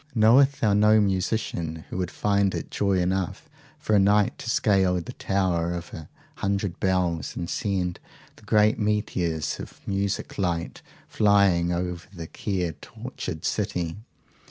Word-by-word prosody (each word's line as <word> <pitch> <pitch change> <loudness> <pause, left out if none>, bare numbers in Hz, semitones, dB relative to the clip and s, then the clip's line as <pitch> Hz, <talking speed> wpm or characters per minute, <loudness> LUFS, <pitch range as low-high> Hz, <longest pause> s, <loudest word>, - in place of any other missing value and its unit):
Knowest 135 +5 +5
thou 105 -3 +3
no 105 +1 +5
musician 95 -5 -1
who - - -4
would 90 -2 -1
find 100 -1 +1
it - - -5
joy 100 -1 +1
enough 90 0 -1 0.3
for 110 - 0
a - - +6
night, 100 +1 +3
to 115 - -6
scale 95 -5 +3
the 85 -2 -4
tower 90 -3 0
of 85 0 -7
a 80 -2 -8 0.3
hundred 100 -2 -2
bells, 90 -5 0
and 85 - -4
send 90 -2 -2 0.4
the - - -18
great 105 +1 +3
meteors 90 -7 -1
of - - -9
music 100 0 -2
light 85 -3 -2 0.3
flying 100 -4 +3
over 90 -1 -3
the 85 -4 -7
care 90 0 -2
tortured 75 - -7
city? 85 -1 -2
95 Hz, 145 wpm, -25 LUFS, 85-105 Hz, 0.4 s, a